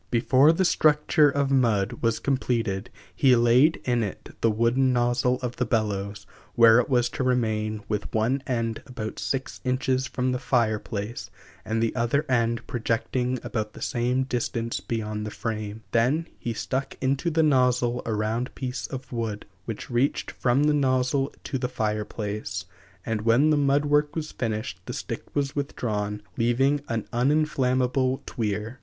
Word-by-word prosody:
Before 130 +5 +5
the 185 +3 +1
structure 150 -2 +4
of 140 -1 0
mud 115 -4 +2
was 115 -1 +1
completed 120 -7 -1 0.3
he 130 -2 +5
laid 120 +7 +4
in 120 -2 +1
it 100 -4 -6
the 115 - +4
wooden 120 +4 +2
nozzle 120 +1 +2
of 125 -1 -3
the 125 - +1
bellows, 105 -3 -1 0.3
where 115 0 +7
it 125 - 0
was 125 -2 +3
to - - -3
remain, 110 -4 0
with 105 -1 -3
one 115 +5 +1
end 115 -3 -1
about 115 -4 -6
six 135 -3 -3
inches 130 0 0
from 130 -1 -1
the 125 - -1
fire 115 -5 +1
place, 105 +2 -5 0.3
and 115 +1 -1
the 115 - -1
other 125 +5 +1
end 115 -2 +1
projecting 125 +2 -1
about 105 -1 -3
the - - -12
same 125 +2 0
distance 120 -2 -2
beyond 105 -2 -3
the 105 - -4
frame; 110 0 -5
then 135 +9 +2
he 120 - -3
stuck 130 +4 -3
into 135 +5 0
the 160 0 +2
nozzle 125 -4 +2
a 115 - -3
round 110 +4 -2
piece 130 0 -4
of 130 -2 -7
wood, 115 -4 -3 0.2
which 115 +2 -6
reached 125 +4 0
from 125 +3 +1
the 150 0 +3
nozzle 135 -1 +1
to 135 - -3
the 125 -1 -2
fire 105 -4 -1
place, 105 -4 -4 0.4
and 110 -2 -1
when 120 +8 +4
the - - +4
mud 145 0 +2
work 145 0 +2
was 155 -1 -3
finished 110 -4 -3
the - - -4
stick - - -5
was 140 -1 -1
withdrawn, 105 -7 -3
leaving 135 +5 +2
an 115 -2 -2
uninflammable 130 -1 +1
tweer. 110 +1 -3
120 Hz, 165 wpm, -26 LUFS, 110-130 Hz, 0.4 s, where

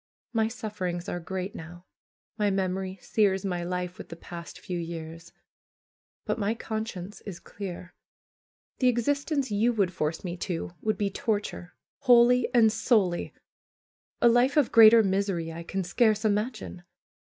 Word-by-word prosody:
My 220 -1 +2
sufferings 205 -7 -4
are 175 - -3
great 185 +3 -5
now; 175 +2 -10 0.5
my 210 -2 +1
memory 190 0 -2
sears 200 -3 +1
my 175 -2 -2
life 180 0 -4
with - - -9
the 165 - -7
past 170 0 -9
few 180 -3 -4
years; 165 0 -7 0.9
but - - -2
my 210 +2 0
conscience 215 -4 -5
is 185 -4 -7
clear. 180 -3 -8 0.9
The 255 - +3
existence 280 +2 0
you 225 +4 +2
would 195 -5 +1
force 155 0 -2
me 180 -1 -4
to 175 -2 -4
would 215 -2 0
be 200 0 -1
torture, 205 -5 -3 0.2
wholly 250 -2 +5
and 230 -3 +5
soully. 210 -5 +1 0.9
A - - +8
life 245 +5 +4
of 290 -5 +3
greater 225 0 +8
misery 190 -4 -1
I 165 - -7
can 190 +3 -3
scarce 215 +3 +2
imagine. 215 -2 -2
200 Hz, 145 wpm, -27 LUFS, 175-225 Hz, 0.9 s, A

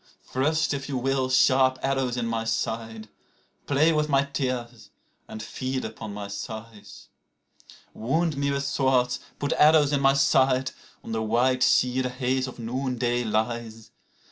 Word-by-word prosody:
Thrust, 150 +4 0
if 135 0 -5
you 135 - -2
will, 130 +1 0
sharp 130 +1 +4
arrows 135 -2 0
in 120 - -1
my 115 -1 -2
side, 115 -1 -3 0.6
Play 150 +3 +3
with 150 0 0
my 135 -1 +3
tears 125 -4 -4 0.4
and 110 - -7
feed 130 +3 -4
upon 110 -2 -7
my 100 0 -6
sighs. 110 +1 -9 0.8
Wound 160 +7 0
me 140 0 -1
with 140 0 -1
swords, 130 -3 +1 0.2
put 145 - -1
arrows 150 -1 +5
in 140 - +1
my 135 0 +4
side. 130 -1 +3 0.3
(On - - -8
the 110 0 -1
white 125 +4 +1
sea 130 0 +3
the 125 - -1
haze 130 +1 -1
of 130 - -9
noon 125 +2 -3
day 120 0 0
lies.) 110 0 -3
130 Hz, 155 wpm, -25 LUFS, 115-135 Hz, 0.8 s, arrows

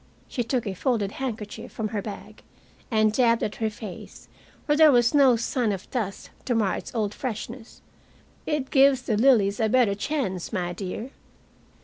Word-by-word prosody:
She 245 - -2
took 240 +1 -1
a 200 - -3
folded 210 -1 -1
handkerchief 220 -3 -6
from 220 -2 -3
her 210 -1 -3
bag 205 0 -9 0.5
and 215 -2 +2
dabbed 230 -1 +3
at 210 - -3
her 220 -1 0
face, 210 -3 -10 0.4
where 295 - +2
there 310 0 +7
was 240 0 +4
no 275 -4 +6
sign 235 0 0
of 195 -2 -5
dust 215 -6 -4
to 245 - 0
mar 210 -4 +1
its - - -8
old 210 -2 -1
freshness. 235 0 -6 0.6
"It 300 -3 -2
gives 270 -2 +5
the 220 - 0
lilies 210 -4 +4
a 220 -1 +2
better 245 -4 +3
chance, 200 - -3
my 180 -4 -2
dear." 205 +7 -6
225 Hz, 170 wpm, -25 LUFS, 210-255 Hz, 0.6 s, there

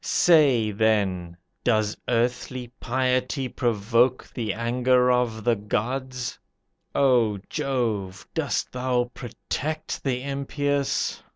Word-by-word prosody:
Say, 140 -10 +4
then, 100 -5 0 0.3
does 110 -3 +2
earthly 120 +1 -1
piety 130 +1 0
provoke 120 +1 +1
The 115 -4 -2
anger 125 +2 +2
of 120 -3 0
the 120 +1 +3
gods? 125 +4 -3 0.6
O 120 -6 +3
Jove, 115 -10 -2
dost - - -1
thou 125 -1 0
protect 150 +5 -4
the 130 -2 -1
impious? 140 0 -1
125 Hz, 95 wpm, -25 LUFS, 110-130 Hz, 0.6 s, Say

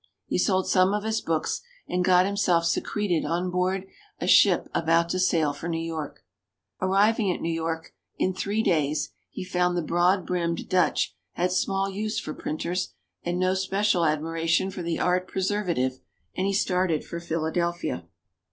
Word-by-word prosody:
He - - -1
sold 190 -3 +2
some 185 +1 +4
of 210 - -2
his 220 0 -1
books 160 -1 -1 0.3
and 180 0 0
got 180 0 +5
himself 190 -4 +2
secreted 180 0 0
on 175 +2 -1
board 185 +1 0 0.3
a - - -2
ship - - +5
about 165 +1 +2
to 185 - -1
sail 160 -5 +2
for 150 +4 -6
New 165 - -1
York. 160 -3 -5 0.6
Arriving 200 +2 +3
at - - -3
New 165 0 -1
York, 165 0 -3 0.2
in 185 - +1
three 205 +4 -1
days 155 -5 +1 0.2
he - - -6
found 180 -1 +1
the 175 - 0
broad 175 +4 +2
brimmed 170 -2 -1
Dutch 180 -2 +1 0.2
had 180 +1 0
small 195 +1 +1
use 210 +3 -2
for 155 - -5
printers 165 - -3 0.3
and 175 +1 -2
no 185 +1 +2
special 195 -1 +1
admiration 165 +4 +1
for 185 - -6
the 170 -1 -2
art 180 +1 +1
preservative; 180 -10 -1 0.4
and 190 - 0
he 200 - 0
started 180 -5 +1
for 170 - -5
Philadelphia. 170 +1 -2
180 Hz, 165 wpm, -26 LUFS, 165-190 Hz, 0.6 s, got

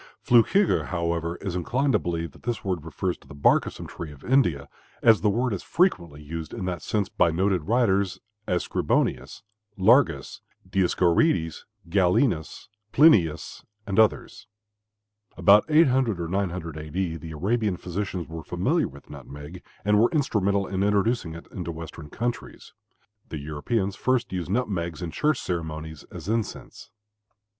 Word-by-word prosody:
Flückiger, 150 - +4
however, 85 -1 -2
is 95 -3 -4
inclined 125 - 0
to - - +4
believe 85 -2 -3
that - - -18
this 120 -4 -4
word 90 -5 -2
refers 85 +3 -3
to - - -21
the - - -11
bark 70 - +3
of - - -5
some - - -9
tree 80 -3 -8
of 70 - -15
India, 90 - +2 0.4
as 115 -2 +6
the 105 - +3
word 120 +3 0
is 95 - -3
frequently 85 - 0
used 80 +2 -6
in 95 - -4
that 90 -1 -3
sense 105 -3 -1
by - - +2
noted 90 0 0
writers, 100 -4 +1 0.3
as 90 -1 0
Scribonius, 65 +8 -1 0.3
Largus, 95 - +3 0.3
Dioscorides, 90 - +1 0.2
Galenus, 90 - +1 0.2
Plinius, 90 - +3 0.2
and 100 +1 0
others. 110 -2 +1 0.9
About 100 +4 +6
800 130 - +3
or 85 - -3
900 90 -3 -3
A. 75 0 -7
D., 90 0 -2
the 80 0 -8
Arabian 105 +3 0
physicians 90 0 -4
were 80 0 -7
familiar - - 0
with 70 +1 -14
nutmeg 75 +5 -10 0.2
and 105 0 +4
were 115 - +5
instrumental 100 - +1
in 95 0 -3
introducing 100 -3 +1
it 85 - -10
into 85 -3 -5
western 80 -1 -9
countries. 120 +8 -5 0.6
The 80 - -5
Europeans 95 +8 -2
first 125 0 0
used 90 -2 -3
nutmegs 90 -7 -2
in 85 - -4
church 150 - +1
ceremonies 80 -3 -5
as 85 -1 -10
incense. 110 0 -4
90 Hz, 150 wpm, -25 LUFS, 80-110 Hz, 0.9 s, as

